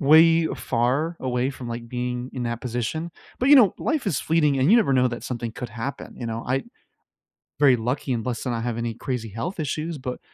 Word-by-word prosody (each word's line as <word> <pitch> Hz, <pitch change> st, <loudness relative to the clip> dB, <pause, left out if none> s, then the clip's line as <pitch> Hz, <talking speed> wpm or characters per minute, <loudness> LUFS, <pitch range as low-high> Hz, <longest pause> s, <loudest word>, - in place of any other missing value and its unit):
way 160 Hz, +2 st, +6 dB
far 135 Hz, +8 st, 0 dB
away 125 Hz, 0 st, 0 dB
from, 130 Hz, -3 st, -8 dB
like, 115 Hz, 0 st, -6 dB
being 125 Hz, 0 st, -3 dB
in 125 Hz, -, -4 dB
that 120 Hz, -1 st, -3 dB
position, 125 Hz, +8 st, -3 dB, 0.3 s
but, 255 Hz, -, +1 dB
you 290 Hz, -, +9 dB
know, 220 Hz, -8 st, +7 dB
life 305 Hz, -8 st, -1 dB
is 150 Hz, -, 0 dB
fleeting, 150 Hz, -4 st, +2 dB
and 130 Hz, +5 st, +3 dB
you 230 Hz, -, +8 dB
never 200 Hz, -12 st, +3 dB
know 130 Hz, -1 st, +4 dB
that 120 Hz, 0 st, -6 dB
something 120 Hz, -2 st, -4 dB
could 120 Hz, 0 st, -6 dB
happen, 120 Hz, +4 st, -6 dB
you 120 Hz, -, -5 dB
know, 115 Hz, 0 st, -3 dB
I 130 Hz, +2 st, 0 dB, 1.0 s
very 140 Hz, -3 st, +6 dB
lucky 125 Hz, +3 st, -2 dB
and 115 Hz, -2 st, -2 dB
blessed 125 Hz, -2 st, -3 dB
to 125 Hz, -, -2 dB
not 115 Hz, -1 st, -2 dB
have 120 Hz, -2 st, -2 dB
any 115 Hz, -1 st, -2 dB
crazy 120 Hz, -4 st, -4 dB
health 165 Hz, -, -5 dB
issues, 155 Hz, +2 st, -2 dB
but 125 Hz, -1 st, -5 dB
125 Hz, 220 wpm, -24 LUFS, 120-155 Hz, 1.0 s, you